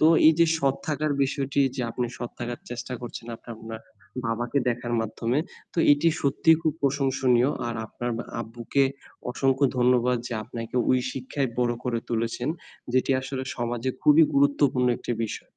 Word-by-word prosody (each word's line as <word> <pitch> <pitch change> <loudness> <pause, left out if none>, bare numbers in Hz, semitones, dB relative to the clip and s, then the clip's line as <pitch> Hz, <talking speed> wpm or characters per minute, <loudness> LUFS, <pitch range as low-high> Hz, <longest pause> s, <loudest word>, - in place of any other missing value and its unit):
তো 155 - +6 0.2
এইযে 165 +1 +5
সৎ 135 -3 +2
থাকার 150 0 0
বিষয়টি 140 +1 0 0.2
যে - - -2
আপনি 120 +1 -2
সৎ 120 - -5
থাকার 120 0 -4
চেষ্টা 120 +1 -5
করছেন 120 -1 -7
আপনার 115 0 -10
ম্যা 110 -1 -5 0.5
বাবাকে 120 +4 0
দেখার 120 0 -1
মাধ্যমে, 115 +3 -1 0.3
তো - - -5
এটি 145 +3 +3
সত্যিই 160 +3 +4
খুব 160 -2 +2
প্রশংসনীয়। 135 -2 +2 0.2
আর 120 - -3
আপনার 120 +3 -4 0.3
আব্বুকে 120 +4 0 0.5
অসংখ্য 135 +2 +2
ধন্যবাদ 125 0 +3
যে - - -5
আপনাকে 115 +1 -6
ওই 130 - +4
শিক্ষায় 135 +1 -2
বড় 120 -1 +2
করে 120 -2 0
তুলেছেন 115 +2 -1 0.4
যেটি 130 +1 +2
আসলে 130 0 -4
সমাজে 120 +1 -1
খুবই 150 +2 +7
গুরুত্বপূর্ণ 140 -2 +3
একটি - - -4
বিষয়। - - -6
125 Hz, 155 wpm, -26 LUFS, 120-140 Hz, 0.5 s, খুবই